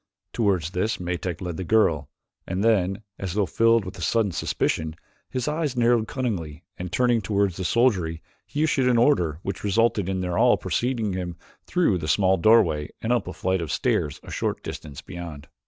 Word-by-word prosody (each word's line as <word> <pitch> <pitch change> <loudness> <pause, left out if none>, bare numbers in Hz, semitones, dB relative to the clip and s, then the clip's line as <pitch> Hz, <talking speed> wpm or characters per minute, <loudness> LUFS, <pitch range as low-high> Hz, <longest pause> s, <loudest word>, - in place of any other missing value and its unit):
Toward 100 -7 +1
this 90 +7 -1
Metak 90 -1 -3
led 90 -3 -4
the 95 - -3
girl, 85 -8 +2 0.4
and 95 +2 -1
then, 100 -2 +2 0.2
as 95 -2 -4
though 105 -2 +2
filled 115 +1 +3
with 95 - -8
a - - -7
sudden 110 -4 +1
suspicion, 80 -1 -1 0.3
his 125 -2 -3
eyes 150 -4 -1
narrowed 120 -2 +3
cunningly 90 - -3
and 90 -1 -6
turning 120 -2 +2
toward 100 0 +1
the 90 +2 -6
soldiery 90 -8 +1 0.2
he 150 - -1
issued 135 -4 +2
an 120 - +3
order 90 - +3
which 95 -1 -4
resulted 105 -1 +2
in 95 -1 -1
their 90 -1 -1
all - - +5
preceding 120 -5 -1
him 90 -2 -4 0.3
through 170 - +2
the 75 - -5
small 95 +3 +3
doorway 85 -7 +4
and 115 +2 0
up 120 -6 0
a 90 - -5
flight 95 -1 -1
of 80 - -4
stairs 70 - 0
a - - -10
short - - -2
distance 70 -3 -7
beyond. 80 -5 -8
95 Hz, 190 wpm, -25 LUFS, 85-115 Hz, 0.4 s, all